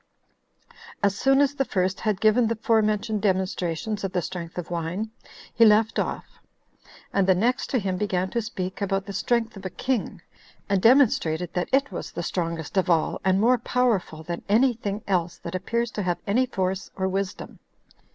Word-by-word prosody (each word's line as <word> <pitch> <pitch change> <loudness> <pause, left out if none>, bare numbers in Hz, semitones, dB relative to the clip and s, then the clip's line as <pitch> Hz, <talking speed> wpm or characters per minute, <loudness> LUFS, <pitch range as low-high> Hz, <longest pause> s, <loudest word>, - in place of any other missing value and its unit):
4. - - -25 0.3
As 200 -1 +3
soon 270 +6 +3
as 285 -1 +2
the 275 - 0
first 185 -5 -1
had 210 -4 -1
given 220 +2 +4
the 230 - 0
forementioned 215 -1 +1
demonstrations 190 0 -1
of 195 -1 -3
the 180 - +1
strength 170 -1 -6
of 175 -1 -5
wine, 175 +6 -3 0.4
he 235 - +4
left 220 0 +4
off; - - -4 0.7
and 195 -1 +2
the 190 - +5
next 240 +7 0
to 260 - +1
him 190 -4 -1
began 185 -2 0
to 235 - 0
speak 190 -4 -5
about 195 -1 -1
the 200 - -7
strength 235 +1 0
of 195 - -10
a 185 - -3
king, 240 +6 -2 0.5
and 195 -2 +1
demonstrated 185 - +3
that 180 - -1
it 275 -3 +2
was 180 - -6
the 170 - -4
strongest 165 0 -3
of 185 -1 +2
all, 165 -2 +1
and 190 0 +3
more 245 +3 +4
powerful 210 -11 0
than 170 +1 -5
any 240 +5 +4
thing 210 -2 -4
else 175 -3 0
that 170 - -8
appears 235 +5 -1
to 210 - -3
have 180 -2 0
any 250 +6 +2
force 190 -4 -2
or 190 -1 -1
wisdom. 195 +1 -4
195 Hz, 190 wpm, -25 LUFS, 185-225 Hz, 0.7 s, the